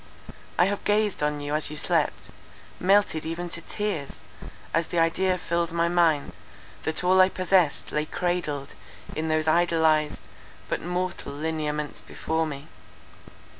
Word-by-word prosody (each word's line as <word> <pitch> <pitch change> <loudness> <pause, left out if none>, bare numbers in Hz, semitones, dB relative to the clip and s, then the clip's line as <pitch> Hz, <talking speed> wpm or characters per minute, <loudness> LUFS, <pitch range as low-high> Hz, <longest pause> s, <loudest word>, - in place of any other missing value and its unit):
I 175 - +5
have 200 +1 -2
gazed 210 -3 +1
on 150 0 0
you 145 +1 -3
as 155 -1 0
you 150 - -6
slept, - - 0 0.5
melted 195 -4 +3
even 170 +2 -4
to 170 - -3
tears, 195 -10 -3 0.6
as 165 0 +1
the 175 - -3
idea 180 +3 +2
filled 170 -1 -1
my 170 0 +1
mind, 160 - +2 0.5
that 160 +2 0
all 185 +1 +5
I 185 - +6
possessed 185 -4 +2
lay 150 0 -1
cradled 165 -6 -2 0.4
in 160 +1 -2
those 155 0 +1
idolized, 160 -2 +3 0.5
but - - -2
mortal 180 -2 -3
lineaments 150 -1 -3
before 160 0 -2
me. 140 0 -7
165 Hz, 140 wpm, -26 LUFS, 155-180 Hz, 0.6 s, I